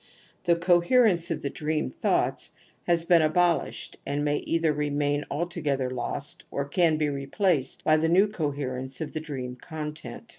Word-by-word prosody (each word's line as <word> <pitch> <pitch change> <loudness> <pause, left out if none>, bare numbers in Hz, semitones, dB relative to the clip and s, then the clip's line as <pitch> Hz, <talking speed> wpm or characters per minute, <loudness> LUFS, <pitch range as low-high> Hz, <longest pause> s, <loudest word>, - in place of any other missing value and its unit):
The 170 - +4
coherence 175 +2 +3
of 165 - -3
the 140 - -2
dream 155 -3 -2
thoughts - - 0 0.3
has 170 -1 +2
been 170 -1 +5
abol 170 +2 +3
ished - - -10
and 145 +1 -2
may 145 0 +1
either 165 -2 +1
remain 145 0 0
altogether 145 -5 -2
lost 140 +3 -5
or 140 - -2
can 160 +1 +2
be 155 -1 +1
replaced 140 +1 -1
by 155 0 +4
the 160 +1 +1
new 190 +5 +5
coherence 140 -8 -3
of 160 - -5
the 155 - -2
dream 130 -5 -6
content. 155 - -7
155 Hz, 160 wpm, -27 LUFS, 140-170 Hz, 0.3 s, been